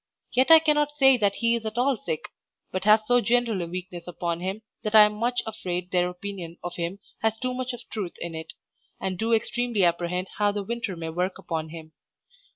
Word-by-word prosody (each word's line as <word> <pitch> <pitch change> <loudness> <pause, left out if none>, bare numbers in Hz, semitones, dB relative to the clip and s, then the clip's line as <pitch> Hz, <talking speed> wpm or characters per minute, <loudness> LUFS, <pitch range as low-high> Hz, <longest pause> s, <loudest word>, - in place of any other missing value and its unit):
Yet 260 +4 +3
I 325 - +11
cannot 300 -2 +2
say 270 -3 +6
that 200 -3 +1
he 230 -1 +2
is 230 - -3
at 220 +1 -5
all 260 +2 +3
sick, 160 -8 -4 0.5
but 185 +1 -3
has 215 +1 +6
so 245 +2 +4
general 235 -3 +1
a 170 - -3
weakness 180 0 -7
upon 170 -1 -3
him 190 +5 -4 0.2
that 215 0 -1
I 215 - +11
am 210 0 +3
much 240 +3 -1
afraid 180 -5 -4
their 180 -1 +2
opinion 180 -2 -7
of 175 0 -5
him 170 +3 -3 0.2
has 220 0 0
too 255 +2 -2
much 255 0 -3
of 245 -1 -9
truth 200 -6 -4
in 170 -1 -5
it, 160 0 -7 0.5
and 190 -1 -2
do 225 +1 0
extremely 230 -1 +1
apprehend 175 +2 0
how 205 0 +3
the 205 -1 -3
winter 230 -2 -3
may 165 -1 -5
work 180 +3 -2
upon 160 -2 -4
him. 160 -1 -10
200 Hz, 215 wpm, -26 LUFS, 175-235 Hz, 0.5 s, I